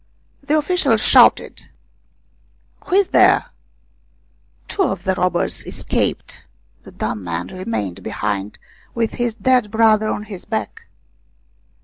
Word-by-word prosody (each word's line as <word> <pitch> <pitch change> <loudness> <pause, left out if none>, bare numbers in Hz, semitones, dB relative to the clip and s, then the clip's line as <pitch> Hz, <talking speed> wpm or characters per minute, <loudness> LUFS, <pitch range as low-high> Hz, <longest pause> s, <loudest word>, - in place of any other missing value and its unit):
The 290 +2 0
official 360 +4 +2
shouted: - - +3 0.5
" - - -35
Who 365 - -1
is 400 -1 +3
there? - - +4 0.6
" - - -39
Two 405 - -3
of 195 - -1
the 190 -1 +1
robbers 180 -1 -1
escaped. - - -3 0.4
The - - -14
dumb 105 -3 -4
man 85 0 -4
remained 110 - -4
behind 105 -1 -4 0.4
with 230 -2 0
his 240 -2 -2
dead 250 -3 +2
brother 220 -1 +3
on 210 - -3
his 200 -4 -9
back. 220 0 -5
210 Hz, 125 wpm, -19 LUFS, -, 0.6 s, there